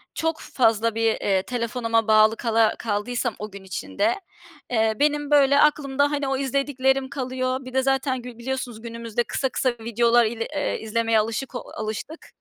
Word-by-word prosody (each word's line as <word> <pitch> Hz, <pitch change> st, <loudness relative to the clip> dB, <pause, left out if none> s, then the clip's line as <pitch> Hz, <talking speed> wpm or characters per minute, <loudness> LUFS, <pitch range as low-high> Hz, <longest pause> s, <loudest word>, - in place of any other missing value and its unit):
çok 325 Hz, 0 st, -1 dB
fazla 225 Hz, -2 st, +1 dB
bir, 225 Hz, 0 st, +2 dB
eee, 190 Hz, -1 st, +1 dB
telefonuma 230 Hz, -2 st, -1 dB
bağlı 215 Hz, 0 st, +5 dB
kala 225 Hz, -2 st, +2 dB
kaldıysam 230 Hz, +2 st, -2 dB
o 210 Hz, 0 st, -6 dB
gün 200 Hz, 0 st, -10 dB
içinde, 310 Hz, -, -1 dB, 0.5 s
eee, 220 Hz, -2 st, +2 dB
benim, 295 Hz, 0 st, +1 dB
böyle, 280 Hz, -1 st, +5 dB
aklımda, 285 Hz, -1 st, +2 dB
hani, 285 Hz, -2 st, -1 dB
o 270 Hz, 0 st, 0 dB
izlediklerim 270 Hz, 0 st, 0 dB
kalıyor. 255 Hz, -1 st, -2 dB
Bir 255 Hz, -, -9 dB
de 265 Hz, -, +3 dB
zaten 270 Hz, -1 st, 0 dB
gü 245 Hz, -1 st, -10 dB
biliyorsunuz 245 Hz, -2 st, -4 dB
günümüzde 230 Hz, 0 st, -3 dB
kısa 265 Hz, +2 st, -2 dB
kısa 255 Hz, 0 st, 0 dB
videolar 235 Hz, +1 st, +3 dB
il 225 Hz, +1 st, -3 dB, 0.2 s
eee, 290 Hz, -, -1 dB
izlemeye 225 Hz, 0 st, +1 dB
alışık 230 Hz, +4 st, -3 dB
o -, -, -1 dB, 0.2 s
alıştık. 220 Hz, +9 st, -6 dB
245 Hz, 165 wpm, -24 LUFS, 225-270 Hz, 0.5 s, bağlı